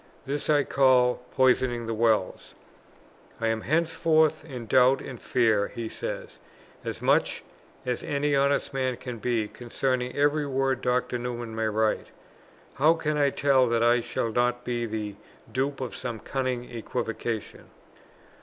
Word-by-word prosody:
This 145 +3 -3
I 145 -2 +4
call 125 -3 +3
poisoning 125 -2 +2
the 115 - -2
wells. 110 -4 0 0.8
"I 115 - +1
am 110 0 -1
henceforth 160 +1 +2
in 130 -7 -7
doubt 130 +3 +4
and 125 -4 -8
fear," 110 -5 +2
he 115 -2 -6
says, - - -6 0.4
"as - - -5
much - - +2 0.4
as 125 -1 -2
any 145 0 0
honest 140 0 +1
man 130 -2 -1
can 125 -3 -7
be, 115 -2 0
concerning 125 +3 -2
every 145 +1 +2
word 135 -1 0
Dr. 125 0 0
Newman 120 -2 -5
may 110 0 0
write. 110 0 0 0.7
_How 160 +4 +5
can 155 -1 0
I 145 -1 +3
tell 135 -2 +3
that 115 0 +1
I 120 +1 +4
shall 115 -1 -2
not 120 +1 +1
be 120 -1 -2
the 105 -2 -4 0.3
dupe 135 +2 -1
of 130 - -4
some 120 -2 -4
cunning 130 +1 -2
equivocation? 115 -1 -4
125 Hz, 145 wpm, -27 LUFS, 115-135 Hz, 0.8 s, How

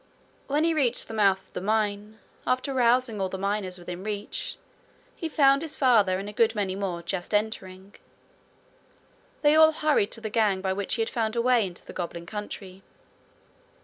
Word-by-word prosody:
When 290 +2 +1
he 330 0 +2
reached 260 -6 +1
the - - -8
mouth 195 -3 +2
of - - -31
the - - -4
mine, 210 +1 -1 0.3
after 255 +2 0
rousing 245 -3 +2
all 190 - 0
the 190 - -5
miners 195 -1 -2
within 175 +1 -7
reach, 210 - -4 0.6
he 325 - -4
found 275 -2 +4
his 320 -2 -3
father 215 -8 +4
and 195 +2 -5
a 210 - -7
good 225 +1 +2
many 200 -3 -1
more 185 -4 -3
just 180 +3 -3
entering. 200 -2 -3 1.5
They 295 0 +6
all 315 0 +7
hurried 300 -9 +2
to 230 - -5
the 220 -1 -5
gang 210 -4 +2
by 190 0 -1
which 200 0 -2
he 230 - +1
had - - -4
found 225 -1 -1
a 235 - +2
way 245 -4 +3
into 175 -1 -11
the - - -10
goblin 170 -1 -5
country. 195 -1 -7
210 Hz, 185 wpm, -26 LUFS, 190-250 Hz, 1.5 s, all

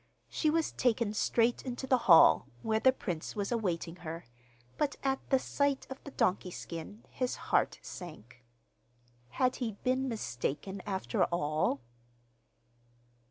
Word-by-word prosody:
She 310 - +1
was 325 +1 +1
taken 235 -3 +1
straight 230 +2 +2
into 255 0 -5
the 255 -1 +3
hall, 165 - +8 0.2
where 220 0 +1
the 260 - +6
prince 180 -10 -5
was 200 0 -2
awaiting 180 -7 -1
her, 165 -1 -7 0.5
but 290 -1 0
at 270 -1 +1
the 265 - +5
sight 280 +1 0
of 265 - -8
the - - -6
donkey 185 -8 0
skin 170 +5 -8
his 255 -1 -1
heart - - +1
sank. 125 - -10 0.9
Had 255 - +1
he 235 -4 -2
been 260 +1 +1
mistaken 190 - -3
after 190 - 0
all? 155 -4 0
215 Hz, 135 wpm, -32 LUFS, 170-255 Hz, 0.9 s, hall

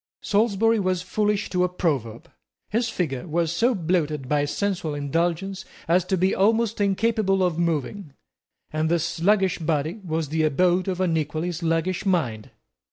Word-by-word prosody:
Salisbury 225 +1 +2
was 185 -2 0
foolish 205 +2 -1
to 180 -1 +2
a 180 - +1
proverb. 135 - -2 0.4
His 230 +2 +1
figure 160 - -3
was 165 0 0
so 235 +8 +2
bloated 155 -6 -1
by 145 +1 +1
sensual 175 -2 -2
indulgence 170 +6 -1 0.2
as 175 +2 +3
to 190 0 0
be 185 +2 +2
almost 220 +2 +2
incapable 200 -1 +1
of 175 -2 0
moving, 165 0 -2 0.6
and 155 +1 0
this 170 -1 +1
sluggish 190 +1 +1
body 160 +4 -1
was 160 -4 -2
the 160 +1 0
abode 175 +4 +2
of 185 -1 -2
an 175 -3 +1
equally 155 +3 -2
sluggish 170 +2 -1
mind. 150 - -1
175 Hz, 155 wpm, -24 LUFS, 160-195 Hz, 0.6 s, as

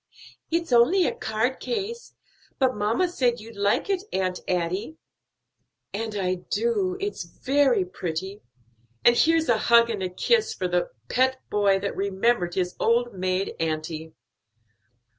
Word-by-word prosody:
"It's 335 -2 -1
only 325 +11 +5
a - - 0
card 220 +4 -1
case; 465 +1 -4 0.4
but 260 -2 +2
mamma 215 - +1
said 250 -8 0
you'd 225 +1 -11
like 200 0 +1
it, 390 -2 0
Aunt 185 -1 -1
Adie." 185 - -2 1.0
"And 215 +1 -3
I 185 -2 0
do; 410 -6 0
it's 405 +1 -3
very 260 +4 +1
pretty. 185 +2 -5 0.6
And 240 - +7
here's 325 +3 +3
a 230 -2 +3
hug 235 +1 +5
and 205 -3 -3
a 185 - -1
kiss 450 - +1
for 185 - -2
the 180 0 0 0.2
pet 260 +1 +2
boy 200 -2 +3
that 200 - -3
remembered 195 -1 0
his 180 -1 -1
old 240 +1 +2
maid 185 0 -1
auntie." 160 0 -3
220 Hz, 140 wpm, -25 LUFS, 185-280 Hz, 1.0 s, And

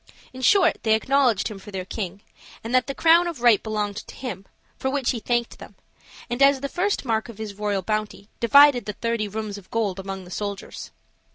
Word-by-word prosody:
In 260 - -9
short, 360 +5 +4
they 220 -1 +3
acknowledged 250 -2 +2
him 210 -2 -8
for 200 - -12
their 190 -2 -5
king, 195 -1 -5 0.4
and 230 +2 -5
that 255 0 +3
the 275 - -4
crown 335 +1 +5
of 335 -6 -5
right 235 -4 +5
belonged 210 -2 -3
to - - -9
him, 200 -7 -7 0.3
for 265 - -2
which 270 -2 0
he 240 - -3
thanked 240 +1 -2
them, - - -12 0.5
and, 240 +2 -4
as 275 -1 +5
the 280 - -3
first 380 -1 -1
mark 225 -1 -1
of 230 - -10
his 215 -2 -6
royal 205 -1 -2
bounty, 215 0 -3
divided 280 +2 +6
the 210 - -4
thirty 230 -1 -2
rooms 210 0 -5
of 190 - -20
gold 205 -5 -1
among 195 0 -6
the 180 - -13
soldiers. 200 0 -6
220 Hz, 210 wpm, -24 LUFS, 205-260 Hz, 0.5 s, divided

